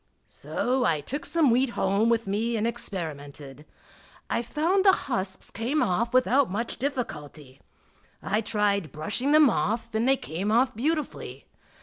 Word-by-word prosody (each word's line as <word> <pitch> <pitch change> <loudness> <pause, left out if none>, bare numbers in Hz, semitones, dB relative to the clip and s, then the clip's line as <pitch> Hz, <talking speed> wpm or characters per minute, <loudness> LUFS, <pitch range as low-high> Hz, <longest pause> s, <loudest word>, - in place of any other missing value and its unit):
So 255 +1 -2
I 160 -6 +2
took 275 - -5
some 320 -7 +3
wheat 255 +2 +2
home 200 +4 +2
with 230 -1 +1
me 220 +4 -1
and 215 - 0
experimented. 150 - -5 0.7
I 235 - +1
found 320 - +1
the 390 - +7
husks 190 - -3
came 250 +7 0
off 230 +3 0
without 255 +1 +3
much 220 +5 -3
difficulty. 150 - -5 0.6
I 210 +3 -1
tried 205 - 0
brushing 210 - -2
them 305 -1 +7
off 225 -1 -1
and 220 +3 +1
they 270 0 +4
came 185 - -3
off 255 +3 +3
beautifully. 305 +6 -3
230 Hz, 145 wpm, -26 LUFS, 190-260 Hz, 0.7 s, the